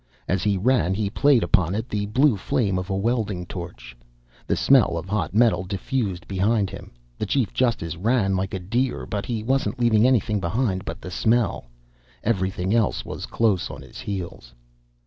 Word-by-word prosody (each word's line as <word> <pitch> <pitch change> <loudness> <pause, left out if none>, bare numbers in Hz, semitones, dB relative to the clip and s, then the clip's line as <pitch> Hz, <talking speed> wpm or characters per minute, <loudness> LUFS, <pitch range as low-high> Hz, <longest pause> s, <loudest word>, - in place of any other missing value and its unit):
As 95 0 0
he 100 -1 +1
ran, 105 -3 +2
he 100 -1 -1
played 140 -1 +4
upon 95 0 +2
it 110 +3 -3
the 105 -3 -2
blue 130 +4 +3
flame 100 -3 0
of 90 +1 -6
a 95 - 0
welding 105 -3 -1
torch. 85 -8 -8 0.5
The - - +1
smell 130 -10 +4
of 85 +2 -5
hot 105 0 -2
metal 110 -6 +4
diffused 100 0 -3
behind 100 +1 +1
him. - - -9 0.3
The 105 - -2
chief 130 0 0
justice 110 -10 0
ran 95 +1 +1
like 95 +1 -2
a - - -3
deer. 120 +8 -1
But 100 -2 -4
he 115 -3 -2
wasn't 135 +1 0
leaving 120 -1 +4
anything 110 -4 +2
behind 95 +1 -1
but - - -6
the 90 - -7
smell. 115 - +1 0.6
Everything 95 -2 0
else 115 -4 +1
was - - -6
close 105 -6 +1
on - - -9
his - - -12
heels. 85 -11 -6
105 Hz, 180 wpm, -24 LUFS, 95-120 Hz, 0.6 s, played